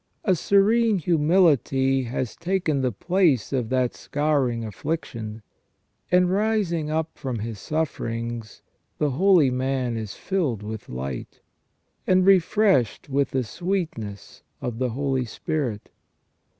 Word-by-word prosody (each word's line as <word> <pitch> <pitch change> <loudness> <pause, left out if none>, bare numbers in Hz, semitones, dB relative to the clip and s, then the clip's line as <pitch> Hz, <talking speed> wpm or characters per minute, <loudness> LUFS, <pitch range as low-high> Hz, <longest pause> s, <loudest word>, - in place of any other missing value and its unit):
A 190 - +3
serene 210 +5 +3
humility 150 - +3
has 125 0 -3
taken 170 -5 0
the 130 -1 +1
place 160 - +1
of 125 -4 -1
that 130 -2 +1
scouring 140 -6 0
affliction, 110 - -5 0.7
and 180 0 +4
rising 195 -6 0
up 160 +1 -2
from 130 -3 -3
his 110 -1 -5
sufferings, 115 -7 -3 0.3
the 150 -2 +1
holy 170 -2 +4
man 130 -1 -1
is 110 -3 -5
filled 150 - -1
with 110 0 -7
light, 65 0 -6 0.7
and 185 0 +4
refreshed 190 - +3
with 140 0 +1
the 130 -1 0
sweetness 120 - -4 0.2
of 120 -2 -4
the 130 -1 0
Holy 135 +1 -1
Spirit. 125 -4 -3
135 Hz, 120 wpm, -24 LUFS, 115-175 Hz, 0.7 s, and